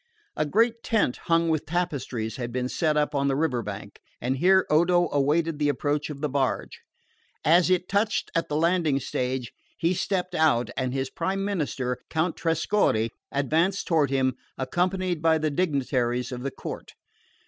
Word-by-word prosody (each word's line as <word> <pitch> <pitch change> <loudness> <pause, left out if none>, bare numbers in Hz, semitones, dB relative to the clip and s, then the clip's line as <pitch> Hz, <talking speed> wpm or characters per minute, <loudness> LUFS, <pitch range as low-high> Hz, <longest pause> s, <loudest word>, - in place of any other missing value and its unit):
A 155 - 0
great 230 +7 +2
tent 220 - +1
hung 165 0 +3
with 155 -2 0
tapestries 140 -10 -2
had 120 -2 -4
been 125 +1 -1
set 155 +3 0
up 150 0 +1
on 140 -1 +1
the 135 - +1
river 140 -5 0
bank; 100 -1 -8 0.2
and 130 +2 -1
here 190 +5 +4
Odo 175 +2 +3
awaited 150 +3 +1
the 145 -1 +2
approach 145 +1 -1
of 140 -2 -7
the 150 - +1
barge. 135 -2 -2 0.6
As 175 +3 +5
it 180 -1 +2
touched 210 +2 0
at 165 - -1
the 150 - -1
landing 165 -3 +2
stage 125 -1 -3 0.3
he 170 +2 +1
stepped 180 -1 -1
out, 155 -8 +2
and 130 -1 -1
his 135 0 -2
prime 195 +1 -2
minister, 140 -10 -2
Count 160 +1 0
Trescorre, 165 - +1 0.2
advanced 160 +8 +1
toward 155 -5 +3
him, 130 -1 +1 0.2
accompanied 180 +4 -1
by 160 0 +4
the 155 -1 -1
dignitaries 130 -6 0
of 125 -1 -5
the 140 - -2
court. - - -8
150 Hz, 170 wpm, -26 LUFS, 130-175 Hz, 0.6 s, As